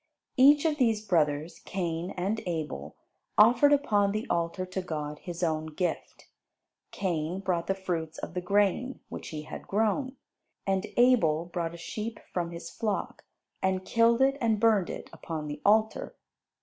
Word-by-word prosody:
Each 285 Hz, +3 st, +6 dB
of 310 Hz, -2 st, +2 dB
these 225 Hz, -5 st, +2 dB
brothers, 155 Hz, -4 st, +1 dB
Cain 175 Hz, -2 st, -3 dB
and 200 Hz, +5 st, -1 dB
Abel, 150 Hz, -, -4 dB, 0.4 s
offered 245 Hz, +7 st, +6 dB
upon 210 Hz, -9 st, +3 dB
the 215 Hz, +2 st, -2 dB
altar 170 Hz, +2 st, -1 dB
to 185 Hz, +1 st, -4 dB
God 150 Hz, -4 st, -5 dB
his 175 Hz, -1 st, -6 dB
own 160 Hz, -1 st, 0 dB
gift. 165 Hz, +3 st, -4 dB, 0.6 s
Cain 175 Hz, -1 st, -2 dB
brought 180 Hz, -3 st, -1 dB
the 195 Hz, -, +1 dB
fruits 165 Hz, -4 st, -3 dB
and -, -, -6 dB
the 180 Hz, -, -2 dB
grain 205 Hz, +7 st, +1 dB
which -, -, -7 dB
he 155 Hz, -2 st, -6 dB
had -, -, -9 dB
grown; 225 Hz, +6 st, 0 dB, 0.5 s
and 195 Hz, +1 st, 0 dB
Abel 200 Hz, -11 st, +4 dB
brought 170 Hz, -1 st, -3 dB
a -, -, -9 dB
sheep 215 Hz, +6 st, -5 dB
from 175 Hz, -2 st, -1 dB
his 170 Hz, 0 st, -7 dB
flock, 210 Hz, -3 st, -3 dB, 0.4 s
and 190 Hz, 0 st, 0 dB
killed 230 Hz, +2 st, +4 dB
it 275 Hz, +1 st, +3 dB
and 225 Hz, -3 st, +2 dB
burned 215 Hz, -5 st, +3 dB
it -, -, -6 dB
upon 160 Hz, -2 st, -5 dB
the 150 Hz, 0 st, -6 dB
altar. 215 Hz, +1 st, +2 dB
185 Hz, 160 wpm, -29 LUFS, 165-220 Hz, 0.6 s, Each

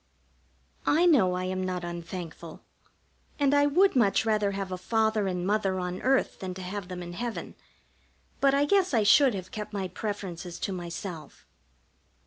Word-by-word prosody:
I 330 Hz, +4 st, +4 dB
know 220 Hz, -, +4 dB
I 180 Hz, -, -2 dB
am 185 Hz, 0 st, -2 dB
not 180 Hz, -1 st, -3 dB
unthankful, 170 Hz, -1 st, -7 dB, 0.8 s
and 285 Hz, -1 st, +3 dB
I 285 Hz, 0 st, +5 dB
would 365 Hz, +6 st, +4 dB
much 225 Hz, -4 st, +3 dB
rather 210 Hz, -2 st, +2 dB
have 195 Hz, -1 st, -4 dB
a 185 Hz, -, -3 dB
Father 220 Hz, 0 st, +1 dB
and 180 Hz, -1 st, -2 dB
Mother 195 Hz, -2 st, +1 dB
on 180 Hz, 0 st, -4 dB
earth 265 Hz, +1 st, +1 dB
than 185 Hz, -1 st, -5 dB
to 190 Hz, -, -7 dB
have 190 Hz, +1 st, -5 dB
them 180 Hz, -1 st, -6 dB
in 175 Hz, 0 st, -8 dB
heaven, 235 Hz, +4 st, -5 dB, 0.9 s
but 275 Hz, 0 st, +4 dB
I 285 Hz, +1 st, +3 dB
guess 375 Hz, -3 st, +2 dB
I 220 Hz, -, +3 dB
should 250 Hz, +3 st, +5 dB
have 185 Hz, -1 st, -7 dB
kept 210 Hz, -1 st, -6 dB
my 195 Hz, -2 st, -2 dB
preferences 185 Hz, -3 st, -5 dB
to 195 Hz, -, -2 dB
myself. 170 Hz, -3 st, -7 dB
195 Hz, 170 wpm, -28 LUFS, 180-230 Hz, 0.9 s, I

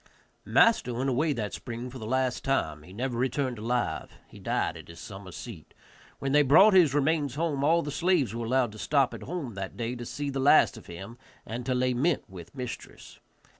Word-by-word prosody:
Master 220 Hz, -, +4 dB
went 130 Hz, +3 st, 0 dB
away 150 Hz, +5 st, +1 dB
that 110 Hz, -5 st, -4 dB
spring 120 Hz, +1 st, -6 dB
for 130 Hz, -, -9 dB
the 110 Hz, -, -6 dB
last 130 Hz, +1 st, 0 dB
time; 80 Hz, -, 0 dB
he 80 Hz, -, -14 dB
never 120 Hz, +4 st, -3 dB
returned 130 Hz, -1 st, -1 dB
alive; 120 Hz, +3 st, -2 dB, 0.2 s
he -, -, -14 dB
died -, -, -1 dB
at -, -, -11 dB
his 85 Hz, 0 st, -12 dB
summer 95 Hz, -1 st, -9 dB
seat. 90 Hz, -3 st, -10 dB, 0.4 s
When 135 Hz, -, -3 dB
they 150 Hz, +1 st, +6 dB
brought 160 Hz, +10 st, +7 dB
his 165 Hz, -7 st, +5 dB
remains 145 Hz, -2 st, +1 dB
home 150 Hz, -3 st, -1 dB
all 160 Hz, +4 st, +4 dB
of 170 Hz, -, -1 dB
the 145 Hz, -, -3 dB
slaves 165 Hz, -, +1 dB
were 115 Hz, 0 st, -4 dB
allowed 125 Hz, -2 st, +2 dB
to 110 Hz, -, -11 dB
stop 140 Hz, 0 st, +2 dB
at -, -, -8 dB
home 150 Hz, -6 st, -5 dB
that 95 Hz, -1 st, -6 dB
day 115 Hz, 0 st, -2 dB
to 120 Hz, -1 st, -7 dB
see 145 Hz, -1 st, -4 dB
the 135 Hz, -, -3 dB
last 140 Hz, +1 st, +5 dB
of 115 Hz, -, -13 dB
him, 95 Hz, +8 st, -9 dB, 0.3 s
and 120 Hz, +2 st, -6 dB
to 130 Hz, -, +1 dB
lament 130 Hz, +5 st, +1 dB
with 90 Hz, +4 st, -12 dB
mistress. 125 Hz, -2 st, -8 dB
130 Hz, 210 wpm, -28 LUFS, 115-145 Hz, 0.4 s, brought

